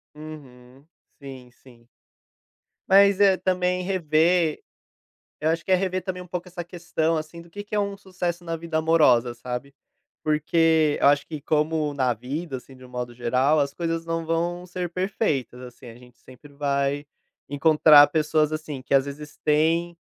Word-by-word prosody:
Uhum. 135 -3 -12 0.3
Sim, 130 -3 -11
sim. 120 -2 -20 1.0
Mas, 200 0 +5
eh, 195 -2 +5
também 180 -1 0
rever, 170 -2 +1 0.8
eu 155 +1 0
acho 165 +1 -1
que 190 - -4
é - - +7
rever 185 0 -2
também 185 -1 -5
um 180 - -11
pouco 180 +1 -5
essa 175 -1 -7
questão, 165 -2 -2
assim, 155 +2 -7
do 170 - -17
que 205 +4 -8
que 210 +1 -6
é - - +2
um 200 -1 -2
sucesso 180 -3 -4
na 165 -1 -3
vida 165 -1 -3
amorosa, 150 -7 +3
sabe? 125 +3 -6 0.5
Porque 155 0 +2
eu - - +5
acho 145 0 +3
que 155 -3 -7
como 155 0 0
na 130 -3 +1
vida, 135 +5 -5
assim, 130 +1 -14
de 130 - -16
um - - -15
modo 125 -1 -5
geral, 130 +5 +1
as 140 -1 0
coisas 165 -1 -3
não 165 0 -3
vão 175 +2 -2
ser 180 -1 -5
perfeitas 170 - -2
assim, 125 0 -12
a 115 - -11
gente 125 0 -19
sempre 140 +3 -16
vai 140 0 -1 0.4
encontrar 150 0 +6
pessoas 155 0 +1
assim 155 -4 -5
que 135 - -4
às 135 0 +3
vezes 145 +1 -9
têm, 165 +3 +1
155 Hz, 175 wpm, -24 LUFS, 140-175 Hz, 1.0 s, é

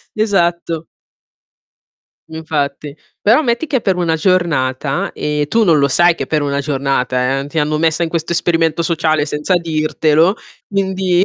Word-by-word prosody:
esatto. 175 -6 0 1.5
Infatti. 150 -2 -4 0.2
Però 225 +7 +4
metti 240 +4 -1
che 275 - 0
è 250 - +1
per 190 -3 +1
una 165 -2 0
giornata, 150 -6 0
e 150 -1 -2
tu 230 +7 +2
non 165 -5 +4
lo 140 - +3
sai 175 +5 +4
che - - -3
è - - -18
per 155 -2 0
una 140 0 -1
giornata, 135 -2 -1
eh. 140 - -6
Ti 160 +3 -4
hanno 150 +1 0
messa 165 +1 +1
in 165 - 0
questo 165 0 -3
esperimento 170 -1 +1
sociale 160 -3 +1
senza 150 +5 -1
dirtelo, 160 +1 +1 0.3
quindi 190 -2 +1
160 Hz, 160 wpm, -16 LUFS, 145-175 Hz, 1.5 s, Però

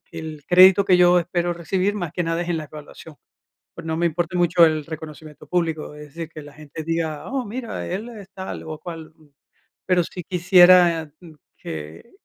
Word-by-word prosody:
que 165 - -11
el 155 -2 -8
crédito 185 +2 +7
que 185 - +4
yo 180 0 +5
espero 175 0 -1
recibir, 185 +4 -1
más 175 -7 -4
que 175 - -2
nada 165 +1 -1
es 175 - -7
en 165 -2 -1
la 155 - -5
evaluación, 150 +1 -12 0.6
pues, - - -10
no 160 0 -2
me 170 +1 +1
importa 175 +2 -2
mucho 175 0 +4
el 155 -2 +1
reconocimiento 155 -1 -10
público, 165 -4 -2
es 150 0 -11
decir, 165 -1 -6
que 155 - -10
la 145 0 -13
gente 150 +1 -9
diga: 160 -2 -3
"Oh, 270 -2 -2
mira, 230 +1 -6
él 200 +7 -4
es 205 -5 -11
tal, 190 -1 -7
o, 155 -1 -7
cual", 165 -2 -9 0.7
pero, 180 -1 +3
sí 180 - -8
quisiera 175 -3 +5 0.4
que 80 - -9
170 Hz, 190 wpm, -22 LUFS, 155-180 Hz, 0.7 s, crédito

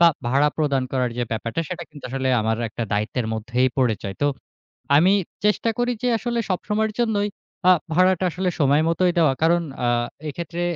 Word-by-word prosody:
বা 170 - +8 0.2
ভাড়া 140 +4 +3
প্রদান 140 -4 +1
করার 125 -2 0
যে - - +1
ব্যাপারটা 115 +7 -2
সেটা 175 -2 -5
কিন্তু 145 -2 -13
আসলে 130 0 -1
আমার 110 +1 0
একটা 110 - -5
দায়িত্বের 110 +3 -1
মধ্যেই 120 +4 +1
পড়ে 125 -4 +2
যায়। 100 -2 -5
তো - - +4 0.7
আমি 175 +6 +5 0.3
চেষ্টা 210 +2 +2
করি 245 0 +1
যে, 250 - +1
আসলে 235 0 -2
সবসময়ের 215 +4 0
জন্যই 210 -3 +1 0.4
আ - - +9 0.2
ভাড়াটা 185 +1 +3
আসলে 185 +2 -2
সময় 145 +1 +4
মতই 175 +2 +2
দেওয়া। 155 -5 +4
কারণ 170 +1 +4 0.2
আ - - +2 0.4
এক্ষেত্রে 170 +3 -5
155 Hz, 180 wpm, -23 LUFS, 125-185 Hz, 0.7 s, আ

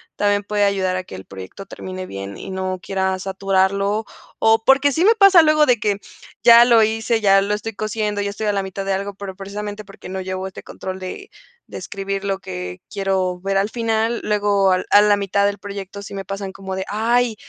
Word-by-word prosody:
también 205 0 +1
puede 205 0 0
ayudar 190 -2 +1
a 185 - -3
que - - -13
el 95 0 -8
proyecto 95 - -10
termine 185 0 -7
bien 100 0 -7
y - - -8
no 185 0 -3
quiera 190 0 -1
saturarlo. 195 +2 0 0.3
O, 225 0 +4
porque 275 +1 +5
sí 325 +6 +1
me 445 - +7
pasa 395 -6 +7
luego, 305 -1 +4
de 245 -3 +3
que 205 -1 0 0.4
ya 235 0 +9
lo 235 -2 +5
hice, 225 +1 +1
ya 195 -1 +5
lo 205 +1 -1
estoy 210 +1 -4
cosiendo, 210 -1 -2
ya 200 0 -2
estoy 215 +1 -4
a 205 - +2
la 195 -1 -1
mitad 190 +1 -5
de 195 - 0
algo, 200 +1 -3
pero 195 -1 -8
precisamente 205 +2 -6
porque 195 -2 -12
no 190 0 -4
llevo 185 0 -4
este 190 - -10
control 185 0 -7
de 190 - -8 0.4
de - - -8
escribir 195 0 -4
lo 195 -1 -1
que 90 - -7
quiero 190 -2 -1
ver 195 +1 0
al 200 +2 +1
final. 230 0 -1
Luego, 205 -2 +2
al 185 0 +1
a 205 - +7
la 205 -1 +4
mitad 200 0 +1
del 205 0 -1
proyecto 200 0 -7
sí 200 - -8
me 195 0 -5
pasan 195 0 -5
como 190 -1 -6
de: 190 0 -3
"Ay, 230 +2 +1
200 Hz, 220 wpm, -20 LUFS, 190-215 Hz, 0.4 s, ya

